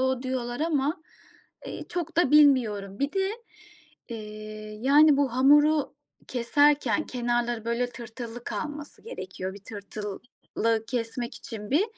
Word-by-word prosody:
o 260 -1 +1
diyorlar 255 0 -3
ama, 310 +1 0 0.6
eee, - - -6
çok 340 -2 -4
da 335 -6 +4
bilmiyorum. 225 -10 +4
Bir 280 +1 0
de, 385 0 +1 0.8
eee, 215 -1 -8
yani 290 +2 +6
bu 275 -4 +2
hamuru 295 +3 +5 0.3
keserken 290 +5 +2
kenarları 240 -2 -1
böyle 235 +1 0
tırtıllı 235 0 -8
kalması 295 -1 -5
gerekiyor. 190 - -6
Bir - - -9
tırtılı 205 -1 -7 0.7
kesmek 235 0 -3
için 220 -6 -8
bir 305 +9 +4
250 Hz, 120 wpm, -27 LUFS, 225-295 Hz, 0.8 s, yani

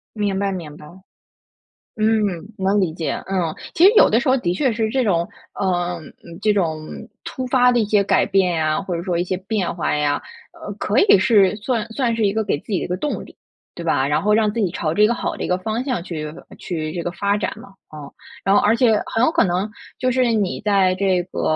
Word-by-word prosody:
明 205 -2 -1
白， 200 0 0
明 165 -6 -6
白。 150 - -13 1.1
嗯， 215 0 +2 0.3
能 195 +1 +1
理 170 -4 0
解， 165 -2 -3 0.2
嗯。 180 -5 -1 0.2
其 335 - +3
实 405 - +8
有 - - +7
的 - - +3
时 - - -3
候 260 - +4
的 175 -7 -1
确 245 +4 +1
是 220 0 -1
这 260 +2 +1
种 170 -5 +1 0.3
嗯， 175 -2 -1 0.2
嗯， 170 0 -11
这 215 - +3
种 160 -5 -1 0.4
突 260 - -5
发 250 -1 +4
的 245 - +2
一 215 - +1
些 205 -1 +2
改 - - +2
变 190 -3 +2
呀， 155 +2 0
或 185 -2 -4
者 170 - -4
说 180 -3 -1
一 175 - +1
些 185 0 -2
变 195 -1 -2
化 165 -3 -1
呀 150 -1 0 0.3
呃， - - -8
可 - - -1
以 390 - +6
是 200 -1 +4
算 225 +1 -2
算 235 -1 0
是 225 -2 +1
一 200 - +1
个 220 0 0
给 175 - -1
自 - - -26
己 190 - +1
的 - - -3
一 - - -6
个 180 +1 -2
动 295 +8 -3
力， - - -16 0.4
对 170 - -7
吧？ 140 -4 +1
然 145 +5 0
后 210 - +3
让 215 -1 +3
自 230 - -4
己 195 -6 +1
朝 155 -3 -2
着 210 +5 +3
一 - - +7
个 235 - +1
好 - - -3
的 - - -4
一 - - -2
个 180 - +1
方 220 +5 -2
向 255 -8 -2
去 155 -4 -5
发 160 - -14
去 155 -3 -4
这 170 -2 -4
个， 175 - -3
发 200 +3 0
展 - - -2
嘛。 - - -13 0.3
嗯。 145 -2 -9 0.3
然 195 +1 +3
后 - - +6
而 215 +2 +4
且 230 -2 +4
很 225 - 0
有 315 - +4
可 - - +3
能 185 +3 -1 0.3
就 255 0 +1
是 250 -2 +2
你 205 -4 -1
在 195 -3 +3
这 185 -1 +1
个， - - -3
195 Hz, 270 characters per minute, -20 LUFS, 175-220 Hz, 1.1 s, 实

